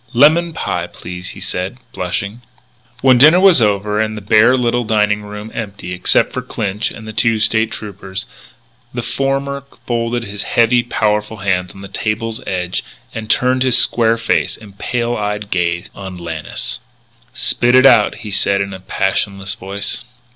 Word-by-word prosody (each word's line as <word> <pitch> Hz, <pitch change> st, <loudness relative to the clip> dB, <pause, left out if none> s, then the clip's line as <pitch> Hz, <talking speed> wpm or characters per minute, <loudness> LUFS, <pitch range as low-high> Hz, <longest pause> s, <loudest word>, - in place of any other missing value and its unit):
"Lemon 160 Hz, +7 st, +5 dB
pie, 165 Hz, -, -3 dB
please," 90 Hz, +1 st, -8 dB
he -, -, -9 dB
said, 90 Hz, +6 st, -3 dB, 0.2 s
blushing. 100 Hz, +5 st, -3 dB, 0.6 s
When 130 Hz, -2 st, +5 dB
dinner 155 Hz, +7 st, +8 dB
was 185 Hz, -8 st, +6 dB
over 105 Hz, 0 st, +1 dB
and 110 Hz, 0 st, -2 dB
the -, -, -6 dB
bare 110 Hz, +5 st, +5 dB
little 120 Hz, 0 st, +1 dB
dining 105 Hz, -1 st, +1 dB
room 105 Hz, +1 st, -8 dB
empty 100 Hz, -5 st, -6 dB
except 90 Hz, -, +2 dB
for -, -, -2 dB
Clinch 105 Hz, +1 st, -2 dB
and 110 Hz, -, -10 dB
the 110 Hz, -, -6 dB
two 115 Hz, 0 st, +2 dB
State 110 Hz, +1 st, +2 dB
Troopers, 100 Hz, -1 st, -6 dB, 0.7 s
the 120 Hz, -, -2 dB
former 135 Hz, +2 st, -1 dB, 0.2 s
folded 120 Hz, 0 st, -1 dB
his 100 Hz, -2 st, -6 dB
heavy, 120 Hz, +1 st, +3 dB
powerful 105 Hz, -2 st, -1 dB
hands 95 Hz, -3 st, -1 dB
on 95 Hz, -, -11 dB
the 100 Hz, -, -8 dB
table's 110 Hz, +3 st, -3 dB
edge 90 Hz, -2 st, -2 dB, 0.3 s
and 110 Hz, -1 st, -6 dB
turned 130 Hz, 0 st, +2 dB
his 130 Hz, -2 st, +4 dB
square 115 Hz, -1 st, +3 dB
face 115 Hz, 0 st, 0 dB
and 100 Hz, -3 st, -15 dB
pale 120 Hz, 0 st, -1 dB
eyed 105 Hz, -1 st, -3 dB
gaze 85 Hz, 0 st, -1 dB
on 95 Hz, -2 st, -8 dB
Lannis. 85 Hz, -3 st, -5 dB, 0.6 s
"Spit 120 Hz, 0 st, +2 dB
it 130 Hz, +1 st, +7 dB
out," 120 Hz, -6 st, +6 dB
he 105 Hz, -, -5 dB
said 100 Hz, 0 st, +2 dB
in 100 Hz, 0 st, -2 dB
a 95 Hz, -, -7 dB
passionless 95 Hz, +1 st, -1 dB
voice. 100 Hz, +1 st, -4 dB
105 Hz, 165 wpm, -17 LUFS, 100-120 Hz, 0.7 s, dinner